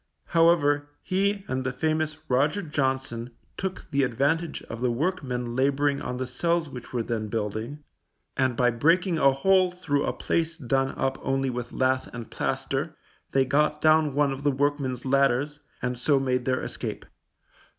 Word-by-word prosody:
However, 145 -4 +3
he 195 +1 0
and 130 0 -2
the 130 - -1
famous 155 +3 -1
Roger 150 +10 +2
Johnson 130 -5 -1 0.3
took 190 -1 -4
the 140 -1 +2
advantage 140 +7 0
of 115 +1 -8
the 125 - +2
workmen 125 -4 -2
labouring 140 +2 +2
on 125 - -4
the 130 - -2
cells 165 +4 0
which 125 -2 -9
were 120 -2 -1
then 110 -2 -2
building, 110 +6 -4 0.5
and 130 -2 +1
by 125 -1 +4
breaking 165 +8 +2
a 135 - +6
hole 185 +7 +3
through 160 -6 -1
a - - 0
place 165 0 -1
done 135 -1 0
up 135 0 -1
only 135 0 0
with 120 -1 -5
lath 130 0 +1
and 120 -2 -7
plaster, - - -2 0.4
they 135 -1 +3
got 150 +3 +2
down 155 -2 +4
one 145 -1 +3
of 135 0 -5
the 145 - +2
workmen's 140 -2 -1
ladders, 140 +2 +2 0.2
and 125 -1 -2
so 140 +1 +3
made 125 -2 0
their 130 -1 0
escape. - - -5
135 Hz, 165 wpm, -26 LUFS, 125-155 Hz, 0.5 s, a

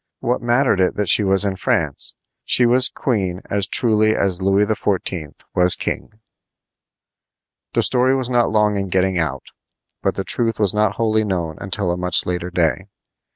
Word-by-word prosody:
What 125 +1 -2
mattered 120 -4 +1
it 90 - +1
that 105 -4 -1
she 105 - +5
was 95 0 +3
in 95 -2 -2
France? - - -2 0.3
She 125 - +3
was 125 +2 +4
queen 95 -8 -2
as 100 -2 +1
truly 110 -1 +2
as 95 -2 -1
Louis 100 +2 +2
XIV. 95 -7 -3
was 90 0 +3
king. - - -4 1.6
The - - +1
story 130 +1 +3
was 130 -2 -2
not 120 -2 +1
long 105 -1 +1
in 100 -1 -3
getting 95 0 0
out, 70 -5 -3 0.5
but - - -1
the - - -3
truth 115 -2 -1
was 100 -4 +3
not 105 -2 0
wholly 110 -1 0
known 85 -6 -3
until 95 -1 -1
a 90 - -3
much 90 -1 +1
later 90 0 -3
day. 85 -3 -1
100 Hz, 170 wpm, -19 LUFS, 90-110 Hz, 1.6 s, she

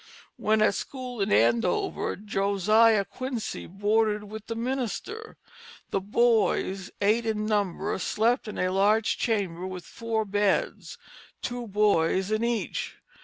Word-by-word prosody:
When 215 0 +2
at 210 - +4
school 250 +1 -5
in 195 - 0
Andover, 115 +3 +2
Josiah 205 +2 +3
Quincy 255 -1 -5
boarded 210 +2 +1
with 215 +1 -9
the 230 - -3
minister. 265 - -4 0.5
The - - +1
boys, 200 -2 +1
eight 220 +3 +2
in 215 -1 -1
number, 205 -2 -1
slept 230 +5 +1
in 210 - -6
a 185 0 0
large 210 +3 +2
chamber 185 -6 -1
with 180 -2 -7
four 225 -1 -2
beds, 205 0 0 0.5
two 245 -1 -4
boys 195 -2 +2
in 215 +1 +1
each. 235 -2 -2
210 Hz, 125 wpm, -27 LUFS, 195-230 Hz, 0.5 s, at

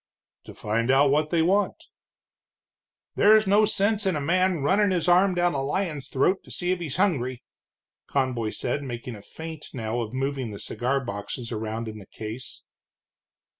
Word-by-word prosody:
"To - - -11
find 115 +3 -1
out 135 +1 +5
what 150 +1 +2
they 165 -1 +2
want." 195 +4 +2 1.4
"There's 215 +1 +5
no 205 +2 +5
sense 205 0 +1
in 185 - +1
a - - -1
man 175 +1 +1
runnin' 200 +7 +3
his 180 -3 0
arm 180 +1 +5
down 175 0 +2
a 135 - -1
lion's 150 0 -2
throat 180 +8 +1
to - - -16
see 180 0 -2
if 185 - 0
he's 155 -6 -4
hungry," 130 -11 0 0.6
Conboy 125 -5 0
said, 125 +5 -2
making 120 -2 -6
a 105 - -10
feint 160 +5 -9
now 115 0 -2
of 110 -2 -4
moving 135 -1 -2
the 105 - -7
cigar 135 +6 -2
boxes 105 +3 -5
around 110 +1 -3
in 110 -1 -7
the 100 - -13
case. 110 +3 -8
140 Hz, 170 wpm, -26 LUFS, 120-180 Hz, 1.4 s, out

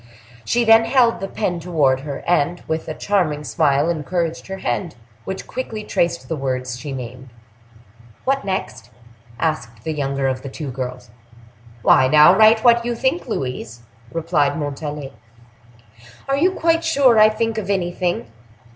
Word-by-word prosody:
She 240 - +1
then 225 0 +6
held 235 -2 +3
the 195 - -4
pen 180 -4 -2
toward 155 -6 +1
her, 140 0 -6
and 175 0 +1
with 160 0 -3
a 155 - -4
charming 165 -8 0
smile 145 -1 +1
encouraged 170 0 -2
her 190 0 -5
hand, 175 -3 -3 0.3
which 190 - -5
quickly 225 -4 -5
traced 170 -4 -1
the 165 - -2
words 130 -3 -3
she 145 +1 -6
named. 125 0 -7 1.0
"What 270 +1 +1
next?" 190 -9 -4 0.5
asked 120 -8 -3
the 160 - -2
younger 140 -2 -1
of 130 -1 -2
the 135 - -7
two 140 0 -6
girls. 125 -2 -6 0.7
"Why, 130 - +5
now 150 +5 +7
write 220 +1 +5
what 235 -1 +5
you 240 0 -2
think, 260 +8 -1
Louise," 125 - -4 0.3
replied 165 -2 0
Montalais. 145 -1 -5 1.1
"Are 275 - +1
you 355 +7 +2
quite 330 -1 +1
sure 275 -8 +4
I 215 0 +7
think 225 0 -1
of 200 -2 -6
anything?" 180 -2 -1
165 Hz, 155 wpm, -20 LUFS, 140-220 Hz, 1.1 s, now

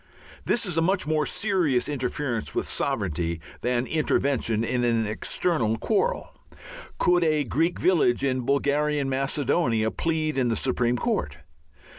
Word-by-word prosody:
This 240 - +1
is 175 -4 0
a - - +2
much 185 +3 +1
more 155 -1 0
serious 180 - +1
interference 130 -3 -3
with - - -1
sovereignty 85 -2 -2 0.2
than 125 +1 0
intervention 135 -7 0
in 120 +1 -1
an 115 -2 +1
external 115 +2 0
quarrel. 225 - -1 0.6
Could 175 -1 +3
a 155 -2 +2
Greek 160 +7 0
village 150 -9 +2
in 130 -2 +1
Bulgarian 140 +2 0
Macedonia 130 -4 0
plead 155 -3 -1
in 125 - +2
the 115 - +1
Supreme 125 -1 0
Court? 75 - -2
135 Hz, 135 wpm, -25 LUFS, 120-155 Hz, 0.6 s, Could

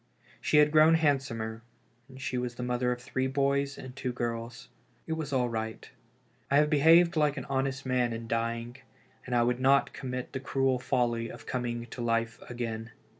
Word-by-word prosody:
She 150 - +2
had 150 0 +6
grown 155 +1 +6
handsomer, 130 -8 0 0.5
and 130 0 -12
she 130 -1 -3
was 125 -1 -2
the 125 - -5
mother 125 0 0
of 125 - -2
three 130 +2 -2
boys 140 +1 0
and 130 -1 -9
two 125 - -3
girls. 115 -1 -4 0.4
It 160 - -2
was 160 -2 -4
all 125 -2 +2
right. 110 -1 -4 0.6
I 140 - +4
had 150 +1 +3
behaved 165 +4 +6
like 150 -1 +2
an - - -4
honest 135 0 -2
man 125 -2 +1
in 115 0 -5
dying, 115 +1 -2 0.5
and 125 - -1
I 120 - +4
would 120 +1 +1
not 135 +1 +3
commit 125 -1 -5
the 130 - -2
cruel 135 -1 0
folly 120 -2 0
of - - -10
coming 120 -2 -3
to 125 - -6
life 115 -1 -1
again. 115 -2 -4
125 Hz, 185 wpm, -29 LUFS, 120-140 Hz, 0.6 s, had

